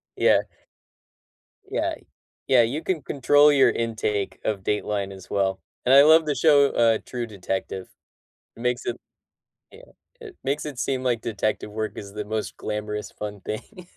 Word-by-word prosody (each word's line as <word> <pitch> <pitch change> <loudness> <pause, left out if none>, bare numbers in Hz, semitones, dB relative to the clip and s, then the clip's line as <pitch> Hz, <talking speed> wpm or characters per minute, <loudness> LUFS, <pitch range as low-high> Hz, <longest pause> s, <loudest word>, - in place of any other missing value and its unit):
Yeah. - - +4 1.3
Yeah. - - -2 0.5
Yeah, 125 -3 +6
you 135 +8 -1
can 170 -6 -2
control 145 +2 +4
your 135 -2 +5
intake 110 -3 -2
of 100 -3 -1
Dateline 105 -1 -2
as 95 -1 -12
well, 95 -1 0 0.2
and 125 - +3
I 140 - +10
love 160 +1 +6
the 145 - 0
show, 145 -3 +5
uh, 115 -2 +3
True 120 -2 -4
Detective. 95 -2 -4 0.7
It - - -13
makes 125 0 -1
it 120 - -2 0.7
yeah, - - -16 0.3
it 425 -5 -11
makes 145 +3 -1
it 140 -4 -7
seem 130 0 -1
like 120 -3 0
detective 110 -1 -2
work 110 0 -4
is 100 -1 -8
the 105 -1 -5
most 110 0 -4
glamorous, 105 0 -4
fun 105 -2 -7
thing. 180 - -7
115 Hz, 160 wpm, -24 LUFS, 105-140 Hz, 1.3 s, I